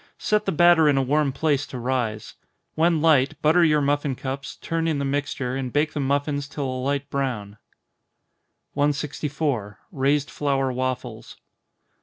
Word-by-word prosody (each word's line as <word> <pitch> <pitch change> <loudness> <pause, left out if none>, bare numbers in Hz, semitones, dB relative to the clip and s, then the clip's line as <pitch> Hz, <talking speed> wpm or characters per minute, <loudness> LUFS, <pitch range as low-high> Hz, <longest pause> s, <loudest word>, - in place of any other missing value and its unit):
Set 210 0 0
the 195 - 0
batter 170 -1 +5
in 140 - +3
a - - +3
warm 145 +1 +1
place 145 0 0
to 130 - -7
rise. 120 -4 -2 0.4
When 165 0 +2
light, 150 -2 +3
butter 165 +3 +5
your 150 -2 +3
muffin 145 -1 0
cups, 135 +1 -5
turn 165 0 -2
in 160 -3 0
the 140 - -2
mixture, 135 -2 -2
and 130 -2 -3
bake 150 +3 +1
the 150 - -3
muffins 140 +1 -1
till 145 -1 -4
a 130 -1 -3
light 140 +1 -1
brown. 110 -7 -3 1.1
164. 145 -6 -1 0.2
_Raised 140 +1 +1
Flour 135 -2 0
Waffles. 130 0 -4
140 Hz, 155 wpm, -24 LUFS, 130-150 Hz, 1.1 s, batter